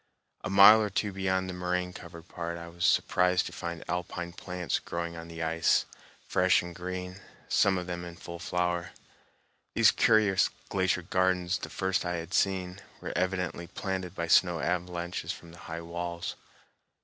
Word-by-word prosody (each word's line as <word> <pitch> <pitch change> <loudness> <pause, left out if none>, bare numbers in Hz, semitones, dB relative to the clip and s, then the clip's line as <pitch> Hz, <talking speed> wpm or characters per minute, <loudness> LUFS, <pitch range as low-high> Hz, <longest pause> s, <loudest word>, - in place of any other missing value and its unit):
A - - -3
mile 100 +3 +9
or 105 - 0
two 100 +1 -1
beyond 95 -1 0
the 90 - -4
moraine 90 0 -2
covered 85 -1 -11
part 85 -1 -5
I 85 0 -8
was 85 0 -2
surprised 90 0 +3
to - - -5
find 85 -2 -5
alpine 85 0 -3
plants 90 0 -3
growing 85 0 -4
on 85 0 -8
the 85 0 -5
ice, 80 0 +2 0.4
fresh 90 0 +3
and 90 0 -7
green, 90 +2 -6 0.3
some 95 -2 +3
of 90 - -3
them 85 -1 -4
in 85 -1 -8
full 85 0 -9
flower. 90 0 -1 0.8
These - - +6
curious 105 -3 +4 0.2
glacier 95 -2 +1
gardens, 90 0 +1
the - - -6
first 95 0 0
I 90 0 -2
had 85 +2 -6
seen, 95 -1 0 0.2
were - - -5
evidently 90 -2 -1
planted 95 0 -4
by 85 - -2
snow 85 0 +4
avalanches 90 0 -2
from 85 - -10
the 85 - -14
high 80 +1 -4
walls. 85 +1 -4
90 Hz, 170 wpm, -29 LUFS, 85-95 Hz, 0.8 s, mile